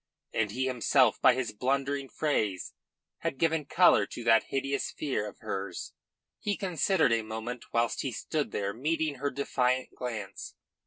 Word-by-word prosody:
And 110 -2 +1
he 130 +5 -1
himself 125 -3 +3
by - - +6
his 130 -2 -2
blundering 135 +4 -1
phrase 110 - -1 0.5
had - - -2
given 160 0 +1
colour 140 - +5
to 120 - -7
that 115 -1 +5
hideous 135 0 -1
fear 135 -8 -2
of - - -16
hers. 95 -2 -4 0.5
He 205 -1 -1
considered 185 - +2
a 115 - +2
moment 110 +2 -6
whilst 115 0 +1
he 135 - -2
stood 150 +6 -2
there 100 0 -2
meeting 150 +3 -1
her 145 +1 0
defiant 130 -2 0
glance. 115 -5 -6
130 Hz, 155 wpm, -29 LUFS, 115-145 Hz, 0.5 s, by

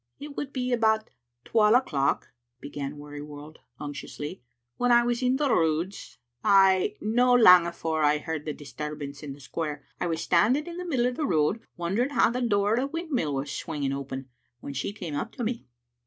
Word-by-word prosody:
" - - -50
It 290 0 -8
would 285 -2 -4
be 250 -2 -1
about 220 -2 +2 0.3
twal 215 0 +4
o'clock," 140 - +1 0.3
began 145 +1 -6
Wearyworld 145 +1 -9 0.2
unctuously, 145 +3 -6 0.4
"when 245 0 +2
I 240 0 +6
was 240 +1 0
in 255 0 +2
the 290 +1 +1
Roods, 165 -3 -1 0.3
ay, 195 -2 +5
no 245 +3 +3
lang 180 -7 +8
afore 160 -2 -2
I 150 0 +4
heard 155 0 -5
the 155 - -2
disturbance 145 -1 -7
in 145 -3 -6
the 140 - -14
square. 150 +1 -5
I - - -1
was 165 -1 -2
standing 245 - +3
in 345 0 -7
the 360 - -5
middle 260 -8 +1
o' 250 - +2
the 290 +4 -2
road, 155 +6 +2 0.2
wondering 195 +10 0
how 285 - +3
the 250 +1 -2
door 205 -3 +2
o' 240 - +2
the 275 - -1
windmill 280 - -2
was 135 +1 -3
swinging 140 -2 -3
open, 135 -1 -5 0.3
when 140 - -7
she 140 +8 -2
came 180 -7 -7
up 145 +11 -3
to 245 - -5
me. 230 +1 -3
180 Hz, 195 wpm, -27 LUFS, 150-245 Hz, 0.4 s, lang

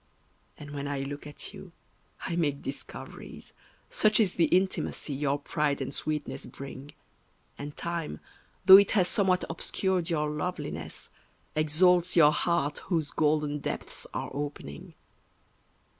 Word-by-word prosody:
And 145 -1 -9
when 140 -1 -4
I 140 -1 -2
look 145 +2 -6
at 145 - -5
you - - -11 0.5
I 170 - -3
make 145 -5 0
discoveries, 135 - -8 0.4
Such 215 +1 +4
is 205 -5 +3
the 170 - +3
intimacy 185 -5 0
your 140 0 0
pride 145 0 -1
and 135 0 -4
sweetness 155 0 -3
bring; 140 +1 -9 0.6
And 145 +1 -8
time, 170 - -3 0.5
though 190 0 +12
it 200 0 +5
has 180 -2 +4
somewhat 185 -2 +2
obscured 180 +1 -1
your 150 -2 0
loveliness, 165 +4 -4 0.4
Exalts 175 +4 +4
your 150 -3 +7
heart 155 -3 0
whose 160 -5 0
golden 150 -1 +1
depths - - -4
are - - -4
opening. 140 - -6
150 Hz, 130 wpm, -29 LUFS, 145-175 Hz, 0.6 s, though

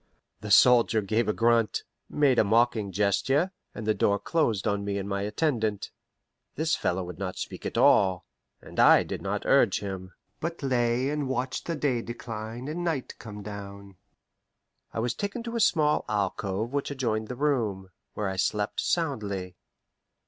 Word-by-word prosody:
The 105 - -7
soldier 115 +1 +6
gave 110 +4 0
a - - +4
grunt, 115 0 +2 0.3
made 140 -4 +3
a - - +6
mocking 110 -1 +2
gesture, 105 - +1 0.2
and 110 - -6
the 110 - +3
door 100 0 +2
closed 115 - 0
on 100 0 0
me 100 0 -2
and 100 0 -4
my 100 0 -2
attendant. 110 -1 -1 0.6
This 160 +2 +1
fellow 90 +1 -1
would 90 +1 -8
not 95 -2 -4
speak - - -5
at - - -5
all, 95 -2 +4 0.4
and - - -8
I - - +7
did - - -6
not - - -3
urge - - +4
him, 95 -2 -6 0.3
but 165 -1 -4
lay 125 0 +1
and 150 -3 -2
watched 130 0 -2
the 170 - -1
day 135 -5 0
decline 115 +1 -6
and 165 +4 -3
night 160 -7 -2
come 105 -2 -9
down. 100 -1 -9 1.0
I - - -8
was 120 +2 0
taken 205 +4 -4
to 235 0 -5
a - - 0
small 155 -8 +3
alcove 100 +2 -2
which 140 -1 -1
adjoined 115 -6 -2
the 125 - -5
room, 115 -10 -1 0.2
where 105 - -2
I 95 0 -3
slept 105 +2 0
soundly. 100 - -2
110 Hz, 170 wpm, -27 LUFS, 100-135 Hz, 1.0 s, I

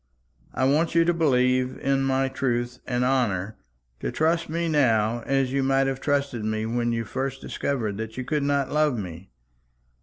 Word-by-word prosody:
I 130 - +1
want 155 +4 +2
you 165 0 +5
to 175 - +3
believe 130 -5 +2
in 135 0 +1
my 135 0 +1
truth 125 -2 -2
and 125 0 0
honour, 110 -6 0 0.4
to - - -3
trust 165 +1 +1
me 170 +1 -1
now 120 -7 +2
as 135 -1 +1
you 140 - +1
might 135 0 +2
have 135 -1 -2
trusted 140 -5 0
me 110 0 -1
when 120 +1 0
you 115 -1 -2
first 135 +3 -3
discovered 115 -10 -2
that 110 +1 -6
you 130 - -4
could 150 +1 0
not 140 -1 0
love 150 -4 +2
me. 90 -2 -7
130 Hz, 180 wpm, -25 LUFS, 120-140 Hz, 0.4 s, you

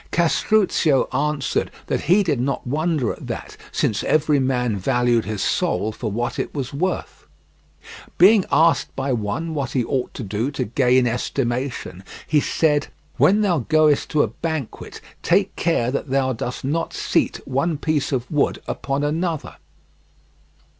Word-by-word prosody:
Castruccio 170 -3 +2
answered 145 +1 0 0.2
that - - -1
he 185 +7 +4
did 150 -9 0
not 135 +2 -2
wonder 150 -2 0
at - - -11
that, - - -6 0.2
since 105 - 0
every 150 -1 +2
man 125 -4 0
valued 120 +3 +1
his 105 -2 -3
soul 110 - 0
for 110 +1 -4
what 120 +4 -2
is - - -2
was 135 -3 -4
worth. 180 +6 -3 0.9
Being 195 +3 +6
asked 160 +3 +3
by 135 -1 -1
one 120 +9 -2
what 140 -4 -3
he 130 - +1
ought 130 0 -2
to - - -5
do 105 +5 -2
to 145 - -2
gain 125 +2 +3
estimation, 120 -4 -2 0.2
he 155 - +3
said: 150 0 +1 0.3
"When 205 +3 +4
thou 180 -6 +2
goest 155 +2 +2
to 150 -2 +3
a - - 0
banquet 160 -7 -5 0.2
take - - +2
care 125 -8 +1
that 140 +1 -3
thou 130 -1 +1
dost 125 +2 -5
not 160 +5 -1
seat - - 0
one 140 +5 0
piece 150 -1 -1
of 125 -3 -1
wood 150 -2 +1
upon 140 +1 -2
another." 160 +1 -2
140 Hz, 155 wpm, -22 LUFS, 125-155 Hz, 0.9 s, Being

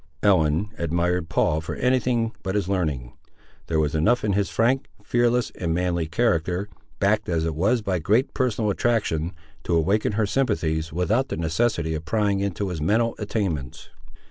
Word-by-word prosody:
Ellen 90 0 +3
admired 85 +1 0
Paul 80 0 +1
for 80 - -5
anything 125 -3 +1
but 95 +1 -3
his 100 -3 0
learning. 75 -11 -2 0.5
There 80 -1 +1
was 75 0 +1
enough 80 +11 +2
in 105 -2 +1
his 100 0 +1
frank, 130 +4 +1 0.2
fearless, 120 +1 +1
and 85 -2 -2
manly 85 -2 0
character, 90 0 0 0.3
backed 105 +1 +1
as 80 -2 0
it 80 - -1
was 105 +9 +1
by 95 -3 0
great 110 - +1
personal 115 -5 0
attraction, 95 -8 0 0.3
to 85 - 0
awaken 100 +7 +1
her 110 +1 +1
sympathies, 85 - 0
without 105 - +1
the - - -3
necessity 85 0 0
of 80 0 -4
prying 100 +3 +1
into 100 0 -2
his 85 -4 -4
mental 115 +8 +2
attainments. 95 - -3
95 Hz, 165 wpm, -24 LUFS, 80-110 Hz, 0.5 s, Ellen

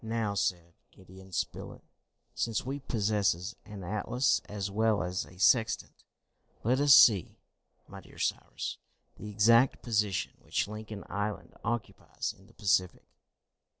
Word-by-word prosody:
"Now," 110 -2 -1
said 85 -4 -1 0.2
Gideon 95 +1 -16
Spilett, - - -4 0.5
"since 115 -1 -2
we 135 +2 -3
possess 105 -6 0
an 105 -3 -9
atlas 110 +7 +1
as 100 -1 -4
well 110 -1 +2
as 90 0 -3
a 90 - -16
sextant, 110 +3 +2 0.6
let 125 +4 +2
us 145 -2 +7
see, 100 -7 +6 0.5
my - - -10
dear - - -17
Cyrus, - - -3 0.4
the 105 - -8
exact 115 +5 +4
position 105 -4 0
which - - -1
Lincoln 105 -1 -7
Island 105 0 -4
occupies 115 -1 -4
in 95 - -21
the 115 - -21
Pacific." 95 -4 +1
105 Hz, 130 wpm, -30 LUFS, 95-115 Hz, 0.6 s, us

